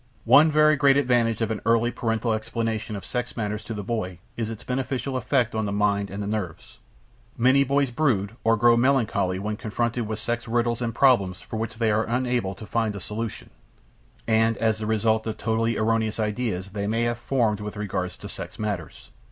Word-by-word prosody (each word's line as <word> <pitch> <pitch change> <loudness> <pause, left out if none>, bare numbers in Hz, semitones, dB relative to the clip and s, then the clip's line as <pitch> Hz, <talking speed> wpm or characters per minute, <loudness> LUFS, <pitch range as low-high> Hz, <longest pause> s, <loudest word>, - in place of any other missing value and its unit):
One 145 +7 +7
very 155 0 +4
great 140 -1 +5
advantage 120 -4 +2
of 110 - -1
an 110 - -3
early 115 +1 +3
paternal 115 -1 -1
explanation 110 0 -3
of 100 - -7
sex 125 0 -4
matters 105 -1 -2
to 115 - -5
the 105 - -4
boy 95 -5 -3 0.2
is 115 -2 -3
its 115 -2 -7
beneficial 130 +1 -2
effect 125 -1 +1
on 110 -1 -1
the 100 - -2
mind 100 0 +1
and 100 +2 -5
the - - -4
nerves. 100 -6 -5 0.6
Many 130 +3 +5
boys 140 -1 +1
brood 115 -7 0
or 115 0 +3
grow 120 +2 +5
melancholy 115 -7 +2
when 105 +2 -3
confronted 120 +1 -2
with 110 0 -3
sex 120 +2 -3
riddles 120 +1 0
and 115 -1 -2
problems 110 -9 +3
for 110 - -7
which 110 0 -3
they 115 -2 +2
are 110 +1 +1
unable 120 -4 -1
to 110 - -9
find 110 -1 -1
a - - -5
solution; 105 +4 -5 0.7
and 115 0 +2
as 110 -1 +1
the 110 - -3
result 110 0 +1
of 110 - -3
totally 115 0 0
erroneous 110 0 0
ideas 105 -3 -2
they 100 0 -3
may 115 +2 0
have 120 0 -1
formed 115 -5 +1
with 105 0 -6
regard 95 -3 -2
to - - -10
sex - - -7
matters. 100 -7 -5
115 Hz, 200 wpm, -25 LUFS, 105-120 Hz, 0.7 s, One